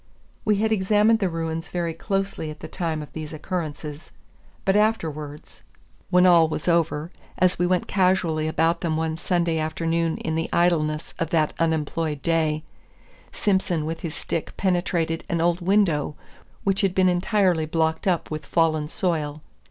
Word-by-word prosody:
We 210 -1 +3
had 220 +2 +1
examined 210 +2 +3
the 195 -4 +1
ruins 165 0 -3
very 170 -2 -2
closely 195 -1 -2
at 150 0 -9
the - - -6
time 160 -4 -3
of 150 - -13
these 155 -1 -6
occurrences; 155 -2 -5 0.5
but 195 0 +3
afterwards, 155 -9 -1 0.5
when 180 0 +5
all 170 -3 +6
was 155 +1 -4
over, 165 -1 +1 0.3
as 180 -1 +2
we 175 - +2
went 180 -1 +1
casually 180 -5 +1
about 165 +2 +1
them 160 -2 0
one 160 0 -1
Sunday 170 -1 0
afternoon 165 +1 -1
in 160 - -3
the 165 +1 -1
idleness 155 -3 +1
of 165 - -1
that 155 -2 +1
unemployed 160 -2 -1
day, 155 -2 +1 0.7
Simson 190 -6 0
with 165 +1 -3
his 165 -3 -5
stick 165 - -4
penetrated 175 -3 0
an 170 - 0
old 170 +1 +1
window 175 -6 +2 0.5
which 195 0 +2
had 195 -2 +1
been 185 -1 +4
entirely 180 -2 +2
blocked 160 +2 0
up 175 -4 0
with 155 -2 -5
fallen 155 -3 +1
soil. 155 -6 -2
165 Hz, 160 wpm, -24 LUFS, 155-180 Hz, 0.7 s, all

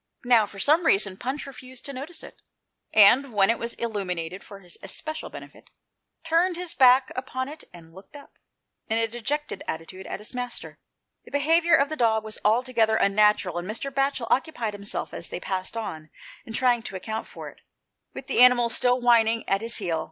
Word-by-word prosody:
Now, 235 -4 +4
for 200 - -12
some 310 - +3
reason. 195 -1 +3
Punch 260 +8 -4
refused 260 -2 -10
to 280 - -6
notice 285 +6 -7
it, - - -13 0.5
and, 240 +6 +6
when 200 +1 +4
it 230 - -2
was 235 0 -4
illuminated 185 -6 -4
for 200 - -11
his 180 -2 -9
especial 310 +11 -5
benefit, - - -12 0.6
turned 340 +3 +2
his 355 -1 -5
back 255 0 +5
upon 260 0 -4
it 310 +2 -10
and 165 -2 -15
looked 190 - -15
up, 285 - -13 0.6
in 220 - +1
a 225 0 +2
dejected 260 +7 -4
attitude, 175 +4 -6
at - - -4
his 210 - -9
master. 245 -1 -5 0.4
The - - -15
behaviour 325 +4 +3
of 280 0 +2
the 310 - -3
dog 225 -4 +2
was 215 -1 -7
altogether 225 0 +2
unnatural, 200 -4 +2
and 175 +3 -7
Mr. 235 +6 -4
Batchel 275 -2 0
occupied 255 -6 0
himself, 200 0 -5
as 170 - -7
they - - -5
passed 190 +4 -4
on, 160 -8 -6 0.4
in 225 - -8
trying 245 0 +2
to 195 - -7
account 220 +4 -5
for - - -9
it, - - -19 0.5
with - - -9
the - - -1
animal 250 -1 +6
still 245 +2 +2
whining 230 -2 +3
at 195 +1 +1
his 230 +1 0
heel. 175 -6 -1
230 Hz, 190 wpm, -25 LUFS, 200-270 Hz, 0.6 s, and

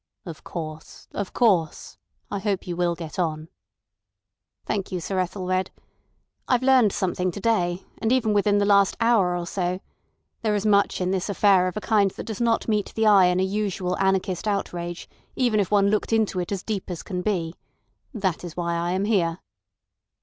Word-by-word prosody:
"Of 165 -4 -9
course, 155 -2 -8
of 200 -2 -4
course. 185 -10 +1 0.3
I 200 - -2
hope 195 -1 -2
you 175 -2 -4
will 175 -1 0
get 165 0 -7
on." 160 -2 -2 1.2
"Thank 200 -3 -2
you, 185 - -2
Sir 185 +3 -2
Ethelred. 185 0 -1 0.8
I've 250 0 +2
learned 255 -5 +5
something 185 -1 -1
to 190 - -6
day, 185 -5 0 0.2
and 225 0 0
even 235 -4 +2
within 205 0 +3
the 205 - +2
last 200 -1 +4
hour 215 -7 +3
or 175 - -4
so. 180 0 -2 0.6
There 215 -2 +1
is 205 0 -2
much 200 -2 +3
in 180 0 0
this 190 +1 -1
affair 195 -2 +4
of 180 - -4
a - - -3
kind 205 -3 +3
that - - -8
does 220 0 -5
not 230 -1 +1
meet 210 -2 0
the 220 - +1
eye 200 -3 +7
in 180 0 +2
a - - +2
usual 190 -2 -1
anarchist 190 0 0
outrage, 175 -4 -3 0.3
even 240 -4 +2
if 195 - 0
one 200 -1 +3
looked 215 - 0
into 220 -4 +1
it 175 +1 -4
as 195 -2 -3
deep 205 -4 -4
as 175 -3 -5
can 180 -2 -4
be. 180 -5 -1 0.6
That's 185 - -3
why 170 -1 -1
I 170 +1 -1
am 190 +2 0
here." 175 -6 +1
190 Hz, 185 wpm, -24 LUFS, 180-210 Hz, 1.2 s, eye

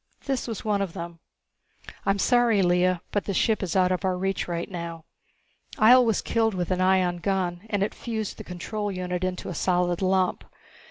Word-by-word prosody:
This 270 -3 -2
was 225 -2 -5
one 205 -2 +1
of 190 -4 -3
them. 170 -2 -7 0.9
"I'm 195 0 +3
sorry, 235 -3 +3
Lea, 180 +1 +3 0.2
but 205 - -1
the 200 - -2
ship 220 +3 +2
is 185 -3 -3
out 185 -1 +3
of 185 +1 -1
our 185 -1 0
reach 195 +1 -2
right 170 -1 -3
now. 170 -3 -6 0.7
Ihjel 245 +3 +7
was 225 -3 +1
killed 225 -3 +1
with 180 0 -2
an 185 0 +1
ion 185 -1 +3
gun 185 +1 -2
and 205 -2 +1
it 205 - -2
fused 220 -3 -4
the - - -6
control 205 +4 -4
unit 180 -1 -3
into 185 0 -3
a - - -4
solid 175 +1 0
lump. 185 -1 +1
185 Hz, 195 wpm, -26 LUFS, 180-205 Hz, 0.9 s, Ihjel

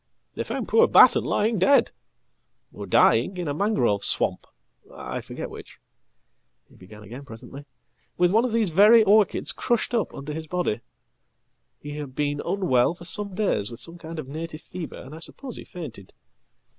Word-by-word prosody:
""They - - -4
found - - -4
poor 465 +1 +4
Batten - - +6
lying 220 0 0
dead, 275 +10 +4 0.8
or - - -8
dying, 190 - +3
in 175 -2 -4
a 145 - -1
mangrove 140 - 0
swamp - - +3 0.4
Iforget - - -7
which," - - -12 0.9
he - - -22
began 105 +3 -14
again 120 +7 -10
presently, 140 +3 -11 0.5
"with 180 0 +3
one 225 +4 +3
of 250 - -1
these 220 -5 +1
very 210 +6 +7
orchidscrushed 215 +3 +1
up 230 -3 0
under 145 +2 -6
his 160 +1 -6
body. 175 -10 -2 1.0
He 145 0 -8
had 140 -3 -7
been 145 0 -1
unwell 170 -7 +1
for 175 - -12
some 200 +1 -5
days 180 - 0
with 115 0 -9
some 170 +4 -8
kindof 160 -2 -7
native 155 +3 -7
fever, 175 -4 -8
and 130 +3 -11
I 160 - -9
suppose 255 +8 -8
he - - -8
fainted. 130 - -10
165 Hz, 160 wpm, -24 LUFS, 140-205 Hz, 1.0 s, very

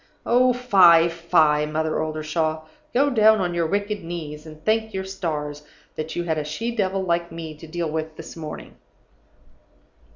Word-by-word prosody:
Oh, 250 +1 +4
fie, 185 -9 +6
fie, 155 -3 +2
Mother 155 +1 -1
Oldershaw! 155 0 -2 0.3
Go 280 +3 +2
down 220 -2 +5
on 180 -2 -1
your 170 -1 0
wicked 205 +3 -1
old 165 - -11
knees, 155 -3 -6
and 155 0 -13
thank 220 -1 +1
your 190 - -2
stars 155 -6 -4 0.3
that 155 +1 -5
you 175 - -1
had 160 -2 -1
a - - -2
she 225 +11 -4
devil 195 -3 0
like 170 -1 -1
me 165 -1 -7
to 165 - -11
deal 165 -1 -3
with 160 0 -4
this 165 - -9
morning! 155 -2 -8
170 Hz, 170 wpm, -23 LUFS, 155-195 Hz, 0.3 s, fie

